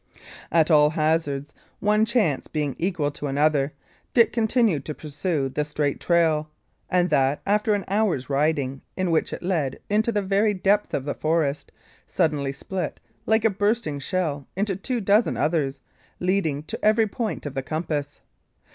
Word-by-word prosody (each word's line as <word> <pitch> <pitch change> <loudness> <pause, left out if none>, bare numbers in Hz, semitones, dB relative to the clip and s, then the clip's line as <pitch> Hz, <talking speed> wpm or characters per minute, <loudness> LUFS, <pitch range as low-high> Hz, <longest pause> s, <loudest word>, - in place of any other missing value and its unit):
At 165 0 +3
all 150 -1 +6
hazards, 155 -2 0 0.3
one 210 +1 +3
chance 220 - +1
being 150 -3 -2
equal 170 -5 0
to 145 - -5
another, 145 0 +2 0.4
Dick 235 -2 +5
continued 220 - +2
to 155 - -5
pursue 150 -1 -2
the 135 +3 -1
straight 150 -1 -2
trail; 160 -3 +2 0.4
and 180 -2 +2
that, 140 -1 +2
after 210 +1 +2
an 200 - -3
hour's 195 - 0
riding, 140 -2 0 0.2
in 185 -2 0
which 160 - +1
it - - -6
led 165 -8 -1
into 220 +3 +2
the 205 -2 0
very 200 +2 +2
depths 200 +3 +1
of 135 - -3
the 145 - -1
forest, 155 -2 -1 0.4
suddenly 150 -6 0
split, 175 +4 -5 0.3
like 220 0 +3
a 225 - +4
bursting 205 -6 0
shell, 150 -3 -2
into 195 0 0
two 240 +5 -2
dozen 205 +3 +3
others, 145 -3 0 0.4
leading 180 -6 0
to - - -7
every 220 +1 +4
point 220 -3 -4
of 145 - -4
the 135 - -2
compass. 150 0 -3
160 Hz, 160 wpm, -24 LUFS, 145-200 Hz, 0.4 s, all